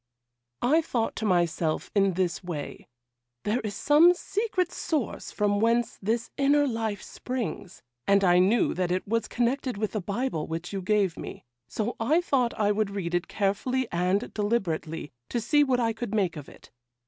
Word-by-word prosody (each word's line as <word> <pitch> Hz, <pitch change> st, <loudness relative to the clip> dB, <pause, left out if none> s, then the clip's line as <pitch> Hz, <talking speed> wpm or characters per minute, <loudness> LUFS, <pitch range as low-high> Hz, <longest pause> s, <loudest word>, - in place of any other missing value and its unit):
'I 300 Hz, +7 st, +4 dB
thought 235 Hz, -8 st, -1 dB
to 220 Hz, -, -2 dB
myself 170 Hz, -3 st, 0 dB
in 195 Hz, -2 st, +3 dB
this 180 Hz, 0 st, -1 dB
way, 160 Hz, -5 st, -6 dB, 0.6 s
"There 215 Hz, +4 st, +1 dB
is 210 Hz, -4 st, -4 dB
some 315 Hz, +9 st, +6 dB
secret 390 Hz, -2 st, -1 dB
source 300 Hz, -8 st, -3 dB
from 205 Hz, -1 st, +1 dB
whence 230 Hz, +2 st, +1 dB
this 225 Hz, +4 st, -1 dB
inner 285 Hz, +1 st, +4 dB
life 225 Hz, -4 st, -2 dB
springs;" 240 Hz, -7 st, -5 dB, 0.2 s
and 200 Hz, 0 st, +4 dB
I 180 Hz, -1 st, +5 dB
knew 200 Hz, +6 st, +3 dB
that 180 Hz, 0 st, -1 dB
it 185 Hz, +2 st, -1 dB
was 230 Hz, +2 st, 0 dB
connected 245 Hz, 0 st, -1 dB
with 215 Hz, 0 st, -1 dB
the 215 Hz, -, -2 dB
Bible 200 Hz, -3 st, -2 dB
which 165 Hz, +4 st, -5 dB
you 195 Hz, -, -2 dB
gave 195 Hz, -2 st, +1 dB
me, -, -, -5 dB
and -, -, -17 dB, 0.3 s
so 220 Hz, -, -2 dB
I 290 Hz, +9 st, +3 dB
thought 260 Hz, -10 st, 0 dB
I 205 Hz, -1 st, +3 dB
would 210 Hz, 0 st, 0 dB
read 190 Hz, -4 st, -4 dB
it 175 Hz, 0 st, 0 dB
carefully 235 Hz, +6 st, 0 dB
and 180 Hz, +3 st, 0 dB
deliberately, 175 Hz, -8 st, -2 dB, 0.2 s
to 240 Hz, -, -1 dB
see 295 Hz, +6 st, +3 dB
what 260 Hz, -3 st, +1 dB
I 230 Hz, -2 st, +1 dB
could 220 Hz, -1 st, -4 dB
make 190 Hz, -6 st, +1 dB
of 150 Hz, -3 st, -8 dB
it. -, -, -17 dB
215 Hz, 180 wpm, -27 LUFS, 185-245 Hz, 0.6 s, some